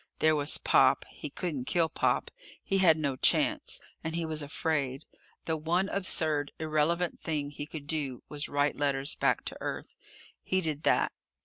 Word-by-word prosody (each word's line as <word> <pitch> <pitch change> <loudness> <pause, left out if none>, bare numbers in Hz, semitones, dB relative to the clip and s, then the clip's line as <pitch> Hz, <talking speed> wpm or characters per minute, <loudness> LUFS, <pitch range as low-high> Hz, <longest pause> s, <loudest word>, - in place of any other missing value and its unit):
There 155 0 +4
was 145 0 +2
Pop. - - +4
He 150 - -7
couldn't 145 -5 -3
kill 170 +2 +2
Pop. - - 0 0.3
He 195 - +1
had 165 -4 +6
no 140 -4 -1
chance - - +2 0.2
and 160 0 -3
he 170 -1 -1
was 155 -1 -2
afraid. 145 -1 -2 0.4
The 160 - 0
one 170 +5 0
absurd, 155 -6 +1
irrelevant 160 +3 0
thing 150 -3 -3
he 145 0 -6
could 150 -2 -8
do 140 -4 -2
was 145 -1 -3
write 145 0 +1
letters 140 -1 0
back - - +1
to - - -5
Earth. - - -5 0.5
He 185 - 0
did 155 -4 -1
that. - - +2
155 Hz, 170 wpm, -30 LUFS, 145-165 Hz, 0.5 s, had